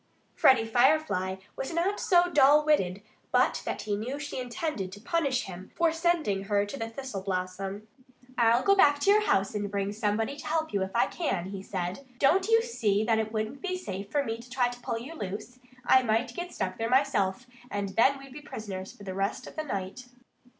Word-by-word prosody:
Freddie 255 -4 +5
Firefly 240 -6 +2 0.2
was 270 - -4
not 355 +5 0
so 355 -1 +4
dull 295 -2 +5
witted 200 -11 +1 0.3
but - - +2
that - - -3
he 205 -1 -1
knew 240 +7 -4
she 285 -2 -5
intended 245 - -3
to 205 - -10
punish 275 0 0
him 185 0 -9
for 335 -1 +3
sending 325 - 0
her 205 0 +1
to 205 - -7
the 225 -4 -4
thistle 230 -4 -6
blossom. 190 +2 -4 0.5
"I'll 235 0 +4
go 395 - +5
back 290 -7 +5
to 395 - +5
your 425 +1 +5
house 195 - +2
and 205 -1 -2
bring 200 0 -2
somebody 220 +4 -1
to - - -8
help 315 -2 -1
you, 200 - +1
if 190 0 -3
I 195 - +4
can," 195 - -2
he 195 -1 -5
said. 185 +5 -4
"Don't 360 +9 +3
you 455 0 +4
see 215 - 0
that 220 0 +2
it 220 0 -2
wouldn't 220 +4 -3
be 370 -1 -2
safe 200 - -6
for 290 -1 +1
me 225 -3 -4
to 240 +1 -13
try 245 -1 +1
to 245 0 -10
pull 230 - -2
you 255 +8 -7
loose? 215 - -6 0.3
I 260 - +6
might 230 +1 0
get 350 0 -5
stuck 185 +2 -3
there 225 0 -1
myself. 255 -5 +2 0.2
And 200 -1 -3 0.2
we'd 275 -1 -12
be 295 - -9
prisoners 195 -8 -7
for 205 - -14
the 190 -1 -5
rest 195 +2 -2
of - - -11
the 310 - -2
night." 200 -1 -5
230 Hz, 210 wpm, -28 LUFS, 200-290 Hz, 0.5 s, I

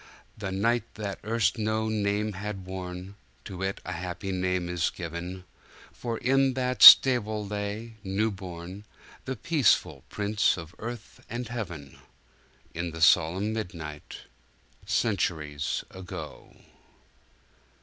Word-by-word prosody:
The 100 -3 -5
night 115 +5 0
that 100 -2 -5
erst 115 +2 +1
no 110 0 0
name 105 0 0
had 100 -1 -6
worn, 90 0 -7 0.3
To 95 -2 -7
it 95 0 -2
a - - -4
happy 90 +2 -4
name 90 -1 -1
is 90 -1 0
given; 90 +2 -6 0.5
For 115 -2 -4
in 135 +1 +2
that 125 -1 -1
stable 110 -5 +9
lay, 105 +2 -5
new 100 +3 0
born, 95 0 -8 0.4
The 130 - -3
peaceful 155 -2 +2
Prince 105 0 +1
of 85 -1 -9
Earth 120 +1 -8
and 120 +1 -4
Heaven, 85 - -6 0.7
In 85 +1 -3
the 80 0 -8
solemn 90 +6 +4
midnight, 85 -8 -6 0.7
Centuries 75 -9 -1
ago! 90 -4 -9
100 Hz, 120 wpm, -27 LUFS, 90-110 Hz, 0.7 s, stable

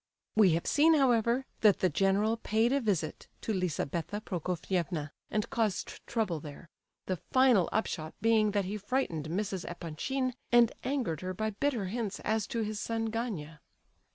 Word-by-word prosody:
We 205 -6 +6
have 165 - -1
seen, 320 +2 +5
however, 245 -2 +3
that 210 -3 +5
the 185 - +5
general 195 +7 +2
paid 225 +2 +1
a 280 - +2
visit 185 -9 -1
to 220 - -2
Lizabetha 180 +1 -2
Prokofievna 175 -4 -2 0.2
and 215 -1 -1
caused 225 -7 -1
trouble 210 -9 -1
there, 150 +3 -10 0.4
the 185 - -1
final 255 - +3
upshot 160 -7 -2
being 220 -1 +4
that 205 -1 0
he 205 +3 -3
frightened 195 - -1
Mrs. 190 +1 -2
Epanchin, 215 - -2 0.2
and 240 -1 +6
angered 245 - -1
her 185 0 -4
by 220 +2 -1
bitter 230 0 -1
hints 210 +1 -3
as 215 -1 0
to 230 - -2
his 215 -1 -3
son 225 0 -2
Gania. 180 - -4
210 Hz, 155 wpm, -31 LUFS, 180-230 Hz, 0.4 s, We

